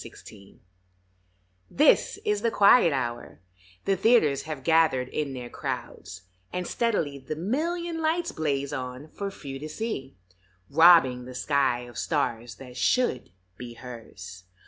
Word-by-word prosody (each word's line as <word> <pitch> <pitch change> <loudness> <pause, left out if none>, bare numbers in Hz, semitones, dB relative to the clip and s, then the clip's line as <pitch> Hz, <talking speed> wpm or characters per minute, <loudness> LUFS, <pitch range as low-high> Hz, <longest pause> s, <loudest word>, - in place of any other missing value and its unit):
BROADWAY 100 -2 -14 1.1
THIS - - +3
is 210 -1 0
the 230 - +2
quiet 200 -3 +5
hour; 120 - -4 0.5
the 195 - +2
theaters 190 - +3
Have 155 -4 -6
gathered 160 -6 +3
in 145 -3 -3
their 125 -2 -6
crowds, 95 +2 -6 0.3
and 180 0 -3
steadily 165 -14 -1
The 130 +3 -6
million 325 - -2
lights 325 +2 0
blaze 140 -3 -2
on 130 +2 -6
for 200 +4 -5
few 140 -8 -8
to 155 +2 -7
see, 150 - -5 0.5
Robbing 145 -6 +6
the 130 0 -9
sky 135 -2 +1
of 120 0 -9
stars 120 -7 -2
that 125 +1 -12
should 185 - +1 0.3
be 120 -1 -9
hers. 110 -7 -10
140 Hz, 135 wpm, -26 LUFS, 125-195 Hz, 1.1 s, Robbing